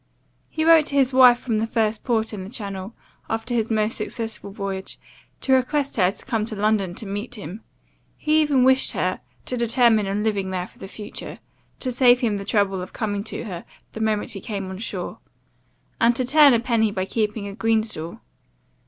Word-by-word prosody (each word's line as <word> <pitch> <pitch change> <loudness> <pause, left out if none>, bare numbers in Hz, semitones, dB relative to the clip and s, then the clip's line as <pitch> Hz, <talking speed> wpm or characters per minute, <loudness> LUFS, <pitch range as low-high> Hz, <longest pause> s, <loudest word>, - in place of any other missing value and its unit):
He 315 0 -1
wrote 325 -2 +6
to 280 - -3
his 270 -2 +3
wife 250 -2 +8
from 230 -3 -1
the 225 - -1
first 220 -1 0
port 225 -3 0
in 195 -3 -5
the 190 - -8
Channel, 200 -3 -6 0.3
after 225 +2 -2
his 230 -2 0
most 215 0 +1
successful 225 -3 -4
voyage, 195 -2 -5 0.4
to 265 - +2
request 275 +2 +1
her 180 -3 +4
to 195 - -9
come 225 -5 0
to 220 - -5
London 205 -3 +1
to 220 - -6
meet 205 +5 -5
him; 200 0 -8 0.6
he 310 +1 +3
even 285 -4 +3
wished 260 +1 +4
her - - -1 0.2
to 255 - -2
determine 235 -3 +3
on 200 +2 -1
living 200 -3 0
there 185 -1 -2
for - - -19
the 195 - -8
future, 205 +1 -8 0.4
to 255 - -1
save 245 0 +5
him 220 -4 +1
the 200 - -6
trouble 195 -3 +1
of 180 - -8
coming 205 -3 -2
to 235 - -5
her 180 -7 -6 0.3
the 220 - -7
moment 215 -1 0
he 195 - -5
came 195 -4 -5
on 190 - -7
shore; 230 - -5 0.8
and 235 +1 +4
to 255 0 -1
turn 285 0 +6
a - - +2
penny 230 -2 +2
by 185 -2 -2
keeping 210 0 -2
a 200 - -6
green 225 0 +2
stall. 170 -7 -7
220 Hz, 205 wpm, -23 LUFS, 200-245 Hz, 0.8 s, wife